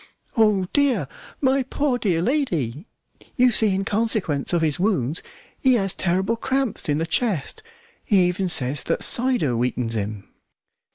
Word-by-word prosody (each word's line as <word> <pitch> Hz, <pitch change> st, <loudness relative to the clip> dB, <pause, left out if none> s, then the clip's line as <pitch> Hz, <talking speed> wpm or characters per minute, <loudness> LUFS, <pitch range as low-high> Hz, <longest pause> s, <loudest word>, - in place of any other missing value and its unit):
"Oh, 210 Hz, -4 st, +3 dB
dear! 260 Hz, -, +2 dB, 0.3 s
my 270 Hz, 0 st, +3 dB
poor, 265 Hz, 0 st, -1 dB
dear 175 Hz, -7 st, 0 dB
lady! 180 Hz, -, -1 dB, 0.5 s
you 250 Hz, -1 st, +4 dB
see 215 Hz, -3 st, +2 dB
in 195 Hz, +1 st, -2 dB
consequence 205 Hz, -10 st, -1 dB
of 170 Hz, -2 st, +1 dB
his 155 Hz, -1 st, 0 dB
wounds 175 Hz, -, 0 dB, 0.4 s
he 260 Hz, -2 st, +4 dB
has 195 Hz, -4 st, 0 dB
terrible 190 Hz, +5 st, 0 dB
cramps 265 Hz, -, -2 dB
in 145 Hz, -, +2 dB
the 165 Hz, -, -1 dB
chest. 190 Hz, -, -1 dB, 0.4 s
He 190 Hz, -5 st, +3 dB
even 180 Hz, +1 st, -1 dB
says 135 Hz, -3 st, +1 dB
that -, -, 0 dB
cider 240 Hz, -, +2 dB
weakens 120 Hz, -1 st, -2 dB
him." 105 Hz, -1 st, -4 dB
190 Hz, 150 wpm, -22 LUFS, 150-240 Hz, 0.5 s, you